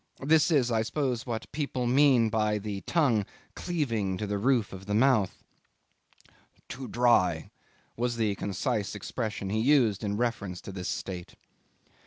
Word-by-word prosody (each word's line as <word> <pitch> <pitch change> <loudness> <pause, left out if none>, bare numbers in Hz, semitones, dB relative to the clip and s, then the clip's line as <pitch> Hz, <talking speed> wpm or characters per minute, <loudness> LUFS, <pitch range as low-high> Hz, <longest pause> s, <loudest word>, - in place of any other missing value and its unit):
This 155 +3 +4
is, 135 -7 +2
I 110 -1 +2
suppose, 125 +1 -2
what 115 -2 -4
people 140 -4 -2
mean 125 -3 +4
by 105 -1 +1
the 100 -1 -5
tongue 130 -11 +2 0.3
cleaving 115 - -2
to 105 - -3
the 100 0 -2
roof 120 -2 +1
of 95 +1 -9
the 105 - 0
mouth. 115 -4 +2 1.2
"Too 130 0 -7
dry," 90 -10 +2 0.4
was 120 0 -1
the 110 -3 +1
concise 100 +1 -2
expression 105 -1 -4
he 110 - 0
used 115 -5 +3
in 100 0 -1
reference 105 -6 -2
to - - -8
this 90 -2 -5
state. 90 -3 -5
110 Hz, 150 wpm, -28 LUFS, 100-130 Hz, 1.2 s, This